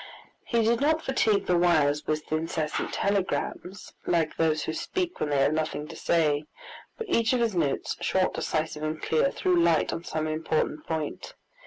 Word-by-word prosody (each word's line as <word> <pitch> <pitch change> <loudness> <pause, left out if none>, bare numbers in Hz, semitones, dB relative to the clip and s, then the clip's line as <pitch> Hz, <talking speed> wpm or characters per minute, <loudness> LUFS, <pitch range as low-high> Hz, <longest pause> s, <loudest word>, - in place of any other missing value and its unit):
He 235 -2 +1
did 230 +2 +2
not 315 +2 +2
fatigue 220 -6 +2
the 180 - +2
wires 150 -4 +3
with 155 0 -2
incessant 155 0 -1
telegrams, 200 -1 -2
like 165 -3 +1
those 155 -2 +1
who 160 - -3
speak 360 - -3
when 150 - -1
they 145 - +1
have 135 +2 +3
nothing 155 -1 -2
to - - -8
say, 155 -3 +1 0.5
but 455 - -5
each 230 - +2
of 250 - +2
his 230 -3 +1
notes, 155 -6 0
short, 190 -1 +1
decisive, 155 0 -2
and 155 0 -2
clear, 160 - +2
threw 185 -8 +1
light 170 -2 +3
on 165 - -5
some 155 -2 -2
important 155 -1 -1
point. 160 -2 -4
165 Hz, 175 wpm, -27 LUFS, 155-200 Hz, 0.5 s, wires